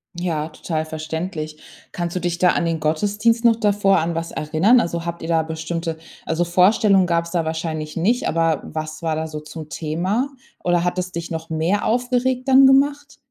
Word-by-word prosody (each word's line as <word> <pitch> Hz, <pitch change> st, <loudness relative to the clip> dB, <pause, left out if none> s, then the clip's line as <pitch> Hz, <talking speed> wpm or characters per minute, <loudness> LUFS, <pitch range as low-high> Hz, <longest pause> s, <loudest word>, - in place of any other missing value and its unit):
Ja, 165 Hz, -3 st, -2 dB
total 155 Hz, 0 st, -3 dB
verständlich. 155 Hz, 0 st, -5 dB, 0.3 s
Kannst 175 Hz, 0 st, -4 dB
du -, -, 0 dB
dich 175 Hz, -1 st, -2 dB
da 180 Hz, 0 st, +4 dB
an 170 Hz, -, +1 dB
den 165 Hz, -1 st, -1 dB
Gottesdienst 205 Hz, +9 st, +1 dB
noch 230 Hz, -1 st, +6 dB
davor 205 Hz, -3 st, +2 dB
an 165 Hz, 0 st, 0 dB
was 165 Hz, 0 st, -3 dB
erinnern? 160 Hz, +11 st, +3 dB
Also, 170 Hz, -5 st, -2 dB
habt 170 Hz, -1 st, -5 dB
ihr -, -, -4 dB
da 165 Hz, -1 st, +2 dB
bestimmte 160 Hz, +1 st, -4 dB, 0.3 s
also, 165 Hz, +2 st, 0 dB
Vorstellungen 190 Hz, +2 st, +4 dB
gab‘s 170 Hz, 0 st, 0 dB
da 170 Hz, -3 st, 0 dB
wahrscheinlich 160 Hz, -1 st, -4 dB
nicht, 230 Hz, +9 st, +1 dB
aber 165 Hz, -2 st, +1 dB
was 155 Hz, 0 st, -6 dB
war 160 Hz, -2 st, -1 dB
da 160 Hz, -, -2 dB
so 155 Hz, -1 st, -6 dB
zum 155 Hz, 0 st, -9 dB
Thema? 185 Hz, -, -1 dB, 0.3 s
Oder, 175 Hz, -1 st, +2 dB
hat 180 Hz, +1 st, -1 dB
es 180 Hz, 0 st, -4 dB
dich 170 Hz, 0 st, -6 dB
noch 160 Hz, 0 st, -5 dB
mehr 165 Hz, +6 st, 0 dB
aufgeregt 250 Hz, +2 st, 0 dB
dann 265 Hz, 0 st, +7 dB
gemacht? 285 Hz, +2 st, +2 dB
170 Hz, 190 wpm, -21 LUFS, 160-200 Hz, 0.3 s, dann